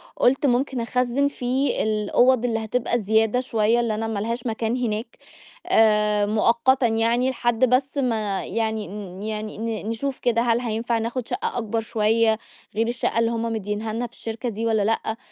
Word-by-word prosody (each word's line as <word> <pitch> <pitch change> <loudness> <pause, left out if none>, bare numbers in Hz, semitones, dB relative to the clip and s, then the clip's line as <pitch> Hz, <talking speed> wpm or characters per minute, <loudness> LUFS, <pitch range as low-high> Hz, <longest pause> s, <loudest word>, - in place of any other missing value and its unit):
قُلت 270 +3 +2
ممكن 260 0 +1
أخزّن 250 +3 +1
فيه 265 0 -1
الأوّض 220 +4 +2
اللي 225 -2 0
هتبقى 240 +2 0
زيادة 220 +3 +2
شوية، 230 -2 +1
اللي 230 -2 0
أنا 225 +1 -2
ما 220 -2 -2
لهاش 230 +3 -3
مكان 225 +1 -1
هناك، 225 -2 -3 0.5
آآ، 210 -1 +4
مؤقتًا 235 +4 +3
يعني 230 +3 +2
لحد 240 -1 +1
بس 265 +3 +1
ما 220 -7 -1
يعني 220 0 -2
ن 195 -1 -8
يعني 215 0 -4
ن 220 -1 -3
نشوف 260 +4 -3
كده 235 -2 +1
هل 235 0 +2
هينفع 230 0 -1
ناخد 235 +2 -3
شقة - - -3
أكبر 225 -1 -1
شوية 220 0 +2 0.4
غير 225 +2 +1
الشقة 240 -1 -1
اللي 230 0 +2
هُم 230 -1 -2
مدّينها 215 +1 -3
لها 240 +2 -2
في 235 - -26
الشركة 230 +2 -5
دي 225 +1 -4
والّا 220 -2 +2
لأ. 220 +1 -1
230 Hz, 170 wpm, -23 LUFS, 220-245 Hz, 0.5 s, آآ